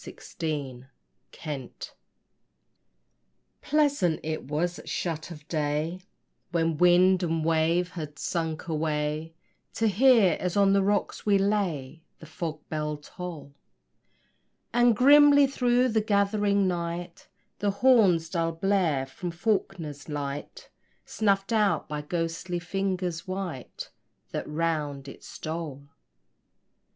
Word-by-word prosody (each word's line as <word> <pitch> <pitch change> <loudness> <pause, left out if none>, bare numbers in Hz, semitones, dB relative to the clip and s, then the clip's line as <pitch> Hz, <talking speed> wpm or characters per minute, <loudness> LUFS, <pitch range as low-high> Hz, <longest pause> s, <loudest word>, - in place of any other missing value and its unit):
HIGH - - -10 0.3
ISLAND 140 -1 -7 1.7
Pleasant 285 - +1
it 155 0 -3
was 165 +5 -2
at - - -10
shut 165 -2 -3
of 150 -3 -11
day, 155 +3 -2 0.5
When 165 -2 0
wind 180 +1 +5
and 165 -2 -1
wave 165 +2 +2
had 150 -3 -7
sunk 160 -1 -3
away, 155 0 -2 0.4
To 225 - +1
hear, 220 -4 +5
as 180 +1 -2
on 200 -1 +5
the 200 - +4
rocks 205 +2 -1
we 200 -1 +5
lay, 185 -8 -1 0.2
The - - -13
fog 155 -2 -6
bell 150 -1 -3
toll; 155 -1 -9 1.2
And 240 -1 +4
grimly 285 +3 +7
through 250 -2 +2
the 220 -1 +2
gathering 200 -1 +2
night 170 0 -4 0.3
The 205 - +1
horn's 200 -7 +4
dull 165 -1 -1
blare 165 -6 +1
from 175 +6 -6
Faulkner's 170 -6 -2
Light, 145 -1 -6 0.3
Snuffed 200 0 0
out 210 -2 +2
by 150 -1 -4
ghostly 165 +3 -3
fingers 180 -1 -3
white 185 -9 -6 0.4
That - - -4
round 150 -3 -2
it 135 - -11
stole. 155 -3 -6
170 Hz, 115 wpm, -27 LUFS, 155-200 Hz, 1.7 s, grimly